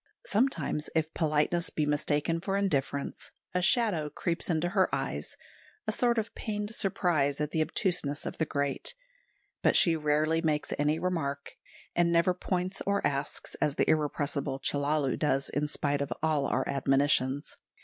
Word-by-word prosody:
Sometimes, 215 Hz, -, 0 dB
if 160 Hz, 0 st, 0 dB
politeness 160 Hz, +2 st, +1 dB
be 155 Hz, -, -1 dB
mistaken 150 Hz, +2 st, 0 dB
for 195 Hz, +2 st, -1 dB
indifference, 140 Hz, -7 st, -1 dB, 0.2 s
a 180 Hz, -, +1 dB
shadow 190 Hz, -, +2 dB
creeps 170 Hz, +4 st, -1 dB
into 170 Hz, +1 st, +1 dB
her 190 Hz, -1 st, +3 dB
eyes, 135 Hz, -, -3 dB, 0.5 s
a 215 Hz, -, 0 dB
sort 240 Hz, +2 st, +2 dB
of 225 Hz, 0 st, -1 dB
pained 210 Hz, 0 st, -4 dB
surprise 155 Hz, -9 st, +1 dB
at 150 Hz, 0 st, -1 dB
the 160 Hz, -, +1 dB
obtuseness 155 Hz, -4 st, 0 dB
of -, -, -5 dB
the 160 Hz, -, +2 dB
great; 140 Hz, -, -1 dB, 0.7 s
but -, -, +3 dB
she 170 Hz, -2 st, +5 dB
rarely 155 Hz, +1 st, +1 dB
makes 155 Hz, -2 st, 0 dB
any 150 Hz, +2 st, +2 dB
remark, 145 Hz, -6 st, -2 dB, 0.4 s
and 170 Hz, 0 st, +3 dB
never 170 Hz, +2 st, +4 dB
points 185 Hz, +1 st, -2 dB
or 200 Hz, 0 st, +1 dB
asks, 140 Hz, -1 st, -2 dB
as 145 Hz, -, +1 dB
the -, -, +1 dB
irrepressible 145 Hz, -2 st, 0 dB
Chellalu 145 Hz, -1 st, 0 dB
does 135 Hz, -2 st, +1 dB
in 150 Hz, +1 st, -1 dB
spite 145 Hz, -1 st, -1 dB
of 140 Hz, -, -3 dB
all 155 Hz, -3 st, +2 dB
our 130 Hz, -, 0 dB
admonitions. 135 Hz, 0 st, +1 dB
155 Hz, 155 wpm, -29 LUFS, 145-180 Hz, 0.7 s, she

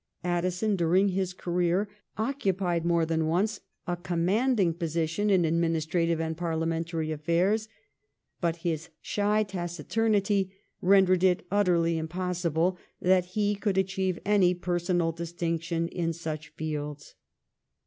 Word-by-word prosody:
Addison 180 Hz, +4 st, 0 dB
during 185 Hz, +3 st, +3 dB
his 190 Hz, -1 st, -1 dB
career 180 Hz, +2 st, 0 dB, 0.3 s
occupied 195 Hz, -8 st, 0 dB
more 170 Hz, -1 st, +3 dB
than 160 Hz, -1 st, 0 dB
once 195 Hz, +7 st, +1 dB, 0.3 s
a 175 Hz, -, -1 dB
commanding 180 Hz, +4 st, +1 dB
position 165 Hz, +4 st, -1 dB
in 190 Hz, -3 st, +4 dB
adminis 165 Hz, -1 st, +1 dB
trative 165 Hz, 0 st, +1 dB
and 160 Hz, 0 st, -2 dB
parliamentary 165 Hz, -1 st, -2 dB
affairs; 175 Hz, +8 st, +1 dB, 0.7 s
but 170 Hz, -1 st, 0 dB
his 165 Hz, -1 st, -1 dB
shy 210 Hz, +1 st, +1 dB
taci 175 Hz, -5 st, -5 dB
turnity 205 Hz, -3 st, +1 dB, 0.3 s
rendered 185 Hz, -1 st, +5 dB
it 180 Hz, -2 st, +3 dB
utterly 170 Hz, -5 st, +2 dB
impossible 175 Hz, +1 st, -1 dB, 0.2 s
that 185 Hz, 0 st, +3 dB
he 205 Hz, -1 st, +2 dB
could 200 Hz, -1 st, -1 dB
achieve 190 Hz, -1 st, 0 dB
any 190 Hz, -3 st, +4 dB
personal 175 Hz, -1 st, 0 dB
distinction 170 Hz, 0 st, -2 dB
in 165 Hz, -2 st, -2 dB
such 155 Hz, -2 st, -5 dB
fields. 150 Hz, -2 st, -5 dB
175 Hz, 120 wpm, -28 LUFS, 165-190 Hz, 0.7 s, rendered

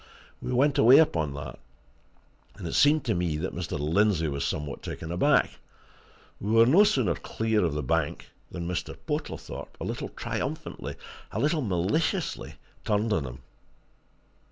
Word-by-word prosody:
We -, -, -4 dB
went 135 Hz, +3 st, +3 dB
away 125 Hz, +5 st, +8 dB
upon 80 Hz, -, +2 dB
that, 70 Hz, -3 st, -7 dB, 1.0 s
and 95 Hz, -4 st, -7 dB
it -, -, -4 dB
seemed 150 Hz, +1 st, +4 dB
to 115 Hz, -, +1 dB
me 85 Hz, -4 st, -1 dB
that 80 Hz, -, -3 dB
Mr. 85 Hz, -2 st, -3 dB
Lindsey 80 Hz, +3 st, +2 dB
was 70 Hz, -1 st, -2 dB
somewhat 75 Hz, -1 st, -3 dB
taken 80 Hz, -, -6 dB
aback. 90 Hz, -, +2 dB, 0.8 s
And 100 Hz, -, -4 dB
we 110 Hz, -, +2 dB
were 115 Hz, 0 st, +7 dB
no 165 Hz, -, +6 dB
sooner 130 Hz, -, +2 dB
clear 110 Hz, +6 st, -1 dB
of 80 Hz, -4 st, 0 dB
the 75 Hz, -, -2 dB
bank 65 Hz, -, -1 dB, 0.2 s
than 85 Hz, -1 st, -5 dB
Mr. 90 Hz, -1 st, -4 dB
Portlethorpe, -, -, -5 dB
a -, -, -5 dB
little -, -, -4 dB
triumphantly, -, -, -4 dB, 0.4 s
a -, -, -3 dB
little 155 Hz, +2 st, +1 dB
maliciously, 115 Hz, -, -1 dB, 0.3 s
turned 105 Hz, +1 st, +1 dB
on 80 Hz, -8 st, 0 dB
him. 65 Hz, 0 st, -8 dB
95 Hz, 155 wpm, -27 LUFS, 80-125 Hz, 1.0 s, away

